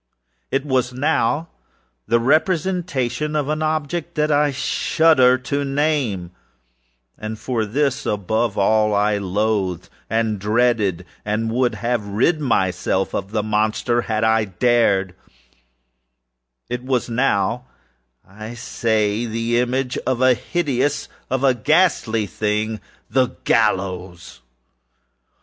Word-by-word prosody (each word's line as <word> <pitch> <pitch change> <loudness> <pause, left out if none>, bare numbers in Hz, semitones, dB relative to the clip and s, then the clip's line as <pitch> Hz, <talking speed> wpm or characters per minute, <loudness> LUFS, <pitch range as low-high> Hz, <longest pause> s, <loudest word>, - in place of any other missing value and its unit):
It 135 +1 -1
was 130 -3 0
now 145 +3 0 0.6
the 120 +1 +3
representation 155 -1 0
of 145 -1 0
an 155 0 -1
object 155 +2 -2
that 150 -1 +1
I 145 0 +3
shudder 135 -1 +3
to 130 +3 -3
nameâand 135 - -1 1.1
for 115 -2 -2
this, 135 +4 -1
above 110 +2 -1
all, 105 +1 +3
I 105 0 +2
loathed, 100 -2 -1 0.2
and 110 -2 0
dreaded, 105 -3 +1 0.2
and 110 +2 -1
would 120 -1 +1
have 115 0 -2
rid 120 +11 +1
myself 95 -6 0
of 95 0 -3
the 105 0 -1
monster 110 +3 0
_had 110 -1 -2
I 110 -1 +2
dared_âit 100 -2 +2 1.7
was 130 -1 -1
now, 115 -1 0 0.6
I 110 +4 -9
say, 110 -1 -1
the 115 +1 0
image 125 +1 -1
of 130 -2 0
a 130 0 +5
hideousâof 145 -1 -1 0.2
a 130 0 +2
ghastly 125 - +2
thingâof 105 +2 -2 0.3
the 130 -1 +2 0.2
GALLOWS! 95 - -1
120 Hz, 110 wpm, -21 LUFS, 105-135 Hz, 1.7 s, a